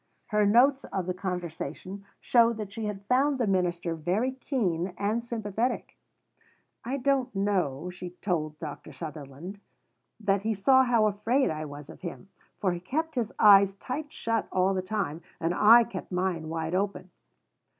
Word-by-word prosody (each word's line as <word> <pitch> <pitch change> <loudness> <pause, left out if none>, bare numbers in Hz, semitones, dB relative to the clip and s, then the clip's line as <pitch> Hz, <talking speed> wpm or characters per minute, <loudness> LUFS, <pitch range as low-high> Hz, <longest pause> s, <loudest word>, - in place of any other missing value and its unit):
Her 210 -1 +3
notes 260 +6 +5
of 190 -2 -3
the 180 - -1
conversation 180 +1 -5
show 235 -1 +4
that 215 -3 -6
she 225 0 -4
had 200 -1 -5
found 270 +4 +2
the 245 - +1
minister 175 -3 0
very 180 +11 0
keen 195 - -2
and 215 +4 0
sympathetic. 230 0 -2 0.9
"I 260 +4 -2
don't 265 -3 0
know," 180 -6 0
she 180 0 -7
told 155 -5 -2
Dr. 150 -2 -8
Sutherland, 155 +4 -8 0.6
"that 200 -2 +1
he 220 +1 -1
saw 260 +6 +5
how 235 -3 +3
afraid 215 +5 +1
I 155 0 -4
was 145 -1 -9
of - - -13
him. 185 +2 -7 0.3
For 190 - +1
he 175 - -3
kept 315 - -2
his 240 -6 -1
eyes 200 -2 +7
tight 290 +8 -5
shut 230 0 -1
all 185 +1 +2
the 185 - 0
time. 185 -5 -3 0.2
And 165 +1 0
I 230 +6 +7
kept 190 -4 -7
mine 180 -3 -1
wide 160 0 -3
open." 190 -1 -2
195 Hz, 160 wpm, -28 LUFS, 175-230 Hz, 0.9 s, eyes